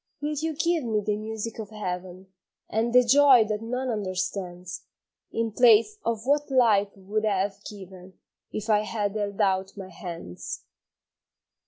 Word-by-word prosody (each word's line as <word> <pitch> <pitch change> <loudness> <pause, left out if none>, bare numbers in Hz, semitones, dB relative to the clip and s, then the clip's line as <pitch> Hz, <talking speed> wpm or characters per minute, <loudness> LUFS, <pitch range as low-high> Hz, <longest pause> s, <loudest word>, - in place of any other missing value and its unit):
Will 295 +1 -2
you 315 +1 -2
give 335 0 +1
me 220 -3 0
the 210 0 -1
music 220 +1 -5
of 215 -2 -6
heaven, 185 -2 -6 0.3
And 225 +2 0
the 250 +1 +6
joy 260 -1 +6
that 215 0 -3
none 250 +3 -3
understands, 185 -3 -4 0.5
In 225 0 -1
place 245 - +5
of 230 -1 -2
what 290 +2 +2
life 225 -6 +4
would 205 +3 -2
have 200 -1 -1
given 190 -2 -11 0.4
If 215 0 -5
I 215 -2 +4
had 210 -1 -2
held 205 -1 -3
out 190 -1 +1
my 190 -2 -7
hands? 170 - -7
215 Hz, 150 wpm, -26 LUFS, 190-235 Hz, 0.5 s, the